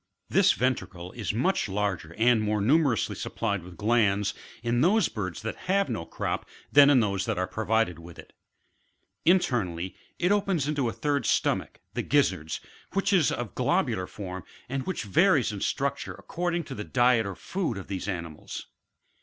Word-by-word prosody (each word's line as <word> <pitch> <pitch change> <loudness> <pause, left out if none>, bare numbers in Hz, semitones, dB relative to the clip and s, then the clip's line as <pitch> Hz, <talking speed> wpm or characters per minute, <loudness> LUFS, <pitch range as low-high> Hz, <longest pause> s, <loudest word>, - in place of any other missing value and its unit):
This - - +5
ventricle 95 -8 -2
is 115 -3 -3
much 125 - +1
larger, 95 -5 -2
and 115 0 +4
more 105 0 0
numerously 130 - +2
supplied 100 -4 -2
with 90 0 -12
glands, 105 -2 +2 0.3
in 120 +1 +1
those 210 +8 +4
birds 105 -3 -5
that 110 - -3
have 200 +1 +3
no 85 - -3
crop, - - -3 0.2
than 145 0 +8
in 135 -4 +6
those 100 -2 0
that - - -1
are 90 - +1
provided 110 -4 0
with 85 0 -12
it - - -13 0.9
Internally, 95 - +1 0.2
it 180 +2 +1
opens 195 -8 +1
into 145 -5 0
a - - -2
third 145 +2 -1
stomach, - - 0
the - - -1
gizzards 80 +1 +1 0.3
w^hich 195 +1 +1
is 175 -7 +4
of 120 -3 -3
a - - -29
globular 95 0 +1
form, 95 -2 -7 0.2
and 135 +1 -2 0.2
varies 135 - +3
in 100 -2 -6
structure 140 0 -1
ac - - -16
cording 175 0 -1
to - - -8
the 105 - -5
diet 120 -2 +3
or 95 - -5
food 175 - -3
of 95 - -6
these 95 0 -4
animals. 85 -5 -5
110 Hz, 170 wpm, -27 LUFS, 95-145 Hz, 0.9 s, than